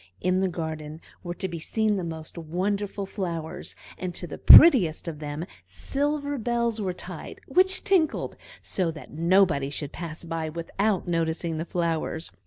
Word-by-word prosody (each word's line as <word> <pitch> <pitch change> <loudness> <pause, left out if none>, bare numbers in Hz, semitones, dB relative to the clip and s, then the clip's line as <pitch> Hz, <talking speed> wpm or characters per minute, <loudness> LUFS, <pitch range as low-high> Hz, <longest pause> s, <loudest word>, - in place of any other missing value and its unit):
In 185 +1 +1
the 190 - +2
garden 160 -3 -5 0.2
were 175 -1 -5
to 190 - -3
be 170 -2 -6
seen 215 +5 0
the 190 - -2
most 160 -2 -7
wonderful 195 +5 -2
flowers, 170 -5 -5 0.2
and 180 -2 -4
to 180 - -4
the 165 - -8
prettiest 210 - +8
of 155 -3 -5
them 150 +2 -5 0.2
silver 285 0 -2
bells 235 -1 -1
were 190 -2 -1
tied, 180 - -9
which 375 +1 +4
tinkled, 370 -7 +1 0.3
so 180 -3 -1
that 160 -1 -9
nobody 170 -3 +3
should 145 0 -5
pass 165 -1 -7
by 165 -1 -3
without 185 +5 -1
noticing 165 -1 -1
the 165 - -3
flowers. 165 -2 -2
175 Hz, 160 wpm, -26 LUFS, 160-205 Hz, 0.3 s, prettiest